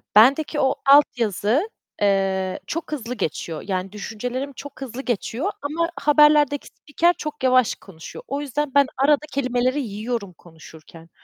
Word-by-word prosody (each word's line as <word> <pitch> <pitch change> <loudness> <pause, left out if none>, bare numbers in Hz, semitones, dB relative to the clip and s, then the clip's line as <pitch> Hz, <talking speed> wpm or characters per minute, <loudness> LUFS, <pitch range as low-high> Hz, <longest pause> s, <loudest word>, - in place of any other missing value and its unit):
Bendeki 280 +7 +5
o 265 -1 +2
altyazı, 255 - +3 0.3
eee, 195 -2 +1
çok 330 -1 -4
hızlı 250 -5 -4
geçiyor 160 -4 -4
yani 185 -1 -2
düşüncelerim 245 +6 -5
çok 280 +1 -11
hızlı 265 0 -6
geçiyor 250 - -2
ama 335 +4 -1
haberlerdeki 295 -1 +4
spiker 340 +4 0
çok 300 -4 -6
yavaş 255 -2 +3
konuşuyor. 165 -5 -12
O 280 +2 -3
yüzden, 290 +1 -2
ben 280 -1 +5
arada 290 +3 +3
kelimeleri 255 +1 0
yiyorum 215 -3 -4
konuşurken. 160 0 -15
255 Hz, 135 wpm, -22 LUFS, 205-290 Hz, 0.3 s, Bendeki